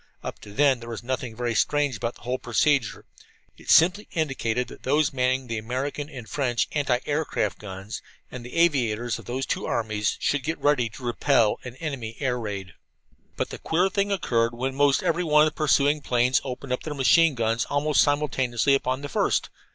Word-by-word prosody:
Up - - -6
to 105 - -12
then 135 +3 +3
there 115 0 -9
was 115 0 -6
nothing 125 -1 -3
so - - -17
very 120 -1 -1
strange 140 +3 +1
about 115 +1 -3
the - - -18
whole 125 +1 -2
procedure. 130 0 +1 0.5
It - - -14
simply 185 +6 +5
indicated 125 -6 -1
that - - -12
those 145 +2 +1
manning 130 0 +1
the 115 -2 -3
American 135 +6 -4
and 125 -7 -9
French 120 -3 0
anti 140 -4 +1
aircraft 145 - -1
guns, 95 +1 -7 0.3
and 125 - -7
the 125 - -9
aviators 120 -9 +1
of - - -13
those 130 +2 -3
two - - -2
armies, 110 -2 -1
should 145 - 0
get 160 +5 -3
ready 140 -5 +2
to 115 +4 -12
repel 120 -2 +2
an 125 -1 -8
enemy 130 -7 -5
air 125 -3 0
raid. 100 -5 -5 0.6
But - - -2
the - - -7
queer 180 +4 +1
thing 200 +1 0
occurred 120 -11 +1
when 130 +2 -2 0.3
every 170 +2 +1
one 150 -2 +5
of 155 - -1
the - - -34
pursuing 145 0 +2
planes 125 0 +2
opened 130 0 -5
up 125 - -2
their 150 -2 -5
machine 155 +3 +4
guns 115 0 0
almost 145 +1 +2
simultaneously 140 -3 +1
upon 130 -1 0
the 145 - -6
first. - - 0
130 Hz, 195 wpm, -25 LUFS, 120-145 Hz, 0.6 s, simply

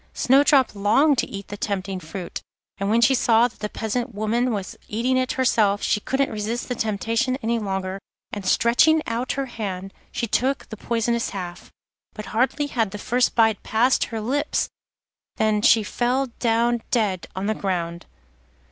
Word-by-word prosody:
Snowdrop 270 -1 +4
longed 235 +8 +3
to - - 0
eat 200 0 -8
the 205 - -6
tempting 195 -2 -3
fruit, 175 +1 -7 0.4
and 195 0 -1
when 230 +2 +3
she 270 - +5
saw 235 -2 +4
that 245 - -18
the 210 - -3
peasant 235 +2 -3
woman 230 +4 0
was 200 -4 -4
eating 240 +4 0
it 255 0 +1
herself, 215 -6 +2
she - - +2
couldn't 270 +5 -1
resist 220 +3 -3
the 250 - -2
temptation 225 +3 -1
any 230 +1 +1
longer, 190 -2 -3 0.3
and 205 - -4
stretching 270 +11 +4
out 235 +3 -2
her 275 -1 -2
hand 195 -6 -5 0.2
she - - -2
took 260 +5 0
the - - -6
poisonous 235 +1 -1
half. 180 -3 -7 0.4
But 215 - -7
hardly 260 +5 +1
had 235 -7 -1
the 205 - -7
first 245 +4 +1
bite 220 -2 +3
passed 240 +4 +2
her 225 - -5
lips 280 +7 -1 0.7
than 215 -1 +1
she 220 +1 +5
fell 250 +4 -1
down 235 0 +2
dead 205 -7 0
on 190 +1 -3
the 215 - +1
ground. 175 -4 -3
225 Hz, 170 wpm, -23 LUFS, 205-245 Hz, 0.7 s, she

